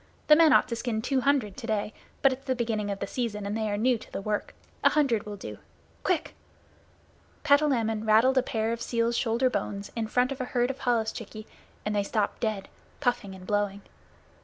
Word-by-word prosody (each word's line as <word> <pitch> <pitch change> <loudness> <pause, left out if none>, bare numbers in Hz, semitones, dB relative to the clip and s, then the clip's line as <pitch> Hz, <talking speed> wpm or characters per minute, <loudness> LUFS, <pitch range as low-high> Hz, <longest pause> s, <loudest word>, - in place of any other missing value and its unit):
The 300 - +10
men 320 -1 +6
ought - - +5
to 235 - -1
skin 225 -2 -2
two 265 +1 +1
hundred 250 -7 +1
to 230 - -6
day, 215 -1 -1 0.3
but 275 -1 +6
it's 270 +1 -10
the 260 - +1
beginning 225 -4 -1
of 200 - -2
the - - -3
season 215 -5 -3
and 200 +1 -2
they 220 -1 -1
are 205 - -1
new 240 +2 +2
to - - -14
the - - -4
work. 210 +1 -3 0.3
A - - +7
hundred 255 -9 +1
will 205 - -5
do. 195 - -8 0.4
Quick!" 365 -5 0 1.1
Patalamon 265 -8 +3
rattled 245 +5 +5
a - - +3
pair 225 -2 -1
of 235 - -5
seal's 235 0 0
shoulder 235 +1 +2
bones 200 -5 -3
in 225 -2 -1
front 250 +4 +1
of 265 - -4
a - - -1
herd 245 0 +1
of 270 - -11
holluschickie 225 -3 -2 0.4
and 210 0 -1
they 205 - +3
stopped 205 +1 -1
dead, 215 -4 -2 0.3
puffing 240 -7 -1
and 185 -1 -12
blowing. 205 0 -1
230 Hz, 210 wpm, -28 LUFS, 210-255 Hz, 1.1 s, The